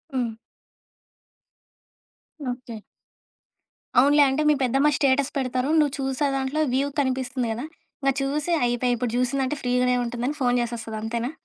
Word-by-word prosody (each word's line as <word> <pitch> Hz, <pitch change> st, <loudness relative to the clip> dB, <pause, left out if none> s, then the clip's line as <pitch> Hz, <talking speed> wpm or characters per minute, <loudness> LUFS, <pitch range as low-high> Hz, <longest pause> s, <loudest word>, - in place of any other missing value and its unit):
హ్మ్. 230 Hz, -3 st, -2 dB, 2.1 s
ఓకే. 245 Hz, -3 st, -8 dB, 1.2 s
అవునులే 285 Hz, +3 st, +6 dB
అంటే 275 Hz, +3 st, 0 dB
మీ -, -, +6 dB
పెద్దమ్మ 270 Hz, +4 st, +3 dB
స్టేటస్ 275 Hz, 0 st, +2 dB
పెడతారు. 255 Hz, 0 st, -1 dB
నువ్వు 290 Hz, -2 st, +2 dB
చూసే 270 Hz, +1 st, 0 dB
దాంట్లో 270 Hz, +3 st, -1 dB
వ్యూ 275 Hz, +2 st, +2 dB
కనిపిస్తుంది 260 Hz, -1 st, -1 dB
కదా! 245 Hz, +6 st, -5 dB, 0.4 s
ఇంక 275 Hz, -, +3 dB
చూసి 295 Hz, +5 st, -1 dB
అయిపేయి. 245 Hz, +1 st, +1 dB
ఇప్పుడు 240 Hz, 0 st, -2 dB
చూసిందంటే 265 Hz, +2 st, 0 dB
ఫ్రీగానే 250 Hz, 0 st, +2 dB
ఉంటుందని 245 Hz, +4 st, -3 dB
ఫోను 245 Hz, 0 st, +3 dB
జేసేస్తది 230 Hz, -2 st, -4 dB
అంతేనా? 235 Hz, +3 st, -2 dB
255 Hz, 125 wpm, -24 LUFS, 245-275 Hz, 2.1 s, అవునులే